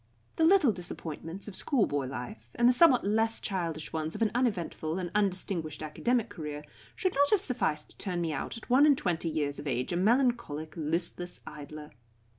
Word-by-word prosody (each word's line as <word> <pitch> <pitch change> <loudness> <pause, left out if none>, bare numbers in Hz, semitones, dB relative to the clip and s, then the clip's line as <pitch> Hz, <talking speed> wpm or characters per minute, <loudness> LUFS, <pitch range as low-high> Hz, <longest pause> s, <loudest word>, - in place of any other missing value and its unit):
The 320 - +4
little 335 - +6
disappointments 175 0 -6
of 205 - -7
schoolboy 145 - 0
life, 120 -2 -7
and 240 - +4
the 250 - +6
somewhat 260 -4 +5
less 225 +2 +1
childish 165 -5 -3
ones 160 0 -2
of 220 - 0
an 215 - +1
uneventful 185 -9 -1
and 180 -2 -3
undistinguished 185 -6 -1
academic 235 +10 0
career, 150 -7 -6 0.3
should 370 -2 0
not 285 +1 +4
have 420 - +4
sufficed 200 - -1
to - - -8
turn 180 -3 -2
me 165 -2 -1
out 145 - -4
at 230 - -12
one 270 +4 +6
and 285 -3 +5
twenty 170 -5 -1
years 145 -2 -2
of 145 - -6
age 125 +4 -1
a - - 0
melancholic, 220 - +1
listless 170 +2 -2
idler. 150 0 -9
180 Hz, 185 wpm, -30 LUFS, 155-235 Hz, 0.3 s, little